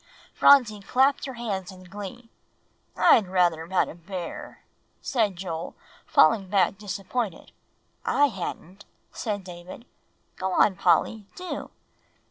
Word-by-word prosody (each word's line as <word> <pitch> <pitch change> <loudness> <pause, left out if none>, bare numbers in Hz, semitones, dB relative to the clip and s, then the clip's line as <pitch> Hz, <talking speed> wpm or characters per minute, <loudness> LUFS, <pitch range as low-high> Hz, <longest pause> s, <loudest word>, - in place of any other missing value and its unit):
Phronsie 245 -7 +5
clapped 265 +9 +2
her 265 - -7
hands 200 -5 -4
in 185 -1 -13
glee. 205 +5 -9 0.7
"I'd 210 -5 +5
rather 175 -3 +2
have - - -18
had 190 - +2
a - - -8
bear," 175 +1 -8 0.4
said 220 -7 0
Joel, 170 -2 -5 0.3
falling 190 +3 +4
back 195 -1 +2
disappointed. 205 0 -4 0.5
"I 290 - +3
hadn't," 190 -1 -7 0.3
said 205 -4 -4
David; 180 +5 -10 0.5
"go 190 0 -2
on, 195 - +4
Polly, 190 +5 +1
do." 365 0 -6
195 Hz, 120 wpm, -26 LUFS, 180-225 Hz, 0.7 s, Phronsie